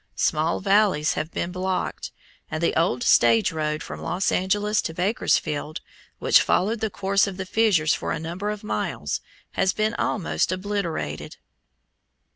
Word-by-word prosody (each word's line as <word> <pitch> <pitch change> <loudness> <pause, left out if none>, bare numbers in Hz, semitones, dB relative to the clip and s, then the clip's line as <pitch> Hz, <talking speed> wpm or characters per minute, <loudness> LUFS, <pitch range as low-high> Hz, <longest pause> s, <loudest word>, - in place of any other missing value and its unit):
Small 155 - +1
valleys 195 -6 +3
have 155 +1 -3
been 170 +1 -3
blocked, 185 0 -3 0.4
and 155 +1 -3
the - - +1
old 140 -7 +1
stage 115 -1 +4
road 155 -1 -2
from - - -8
Los 185 +2 0
Angeles 205 +3 +1
to 160 - -5
Bakersfield, 155 -6 0 0.4
which - - +5
followed 215 +5 +1
the 220 +1 -1
course 195 0 +1
of 190 -2 -6
the 190 - -4
fissures 195 -6 +3
for - - -3
a - - -1
number 170 +6 -4
of 210 0 -5
miles, 210 - -2 0.3
has 190 0 +1
been 215 +1 0
almost 190 -5 0
obliterated. 185 - -3
185 Hz, 150 wpm, -24 LUFS, 155-205 Hz, 0.4 s, which